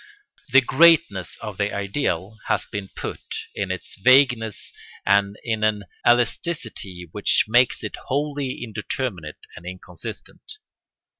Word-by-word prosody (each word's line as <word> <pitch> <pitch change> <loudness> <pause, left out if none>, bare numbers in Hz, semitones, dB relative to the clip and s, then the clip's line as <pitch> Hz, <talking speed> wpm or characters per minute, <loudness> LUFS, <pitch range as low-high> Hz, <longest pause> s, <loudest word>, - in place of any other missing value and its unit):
The 135 +2 +8
greatness 130 - +4
of 105 -3 -6
the 100 0 +1
ideal 100 - -2
has - - +1
been 100 -2 -6
put - - -5 0.3
in 100 -2 -3
its 95 0 -4
vagueness 125 -2 +3 0.3
and 100 +1 +3
in 110 -2 -1
an 105 -1 +1 0.2
elasticity 120 - 0
which 105 - +2
makes 120 +3 +3
it - - -5
wholly 140 -2 -2
indeterminate 105 - -4
and 85 - -11
inconsistent. 90 -1 -8
105 Hz, 120 wpm, -23 LUFS, 95-130 Hz, 0.3 s, The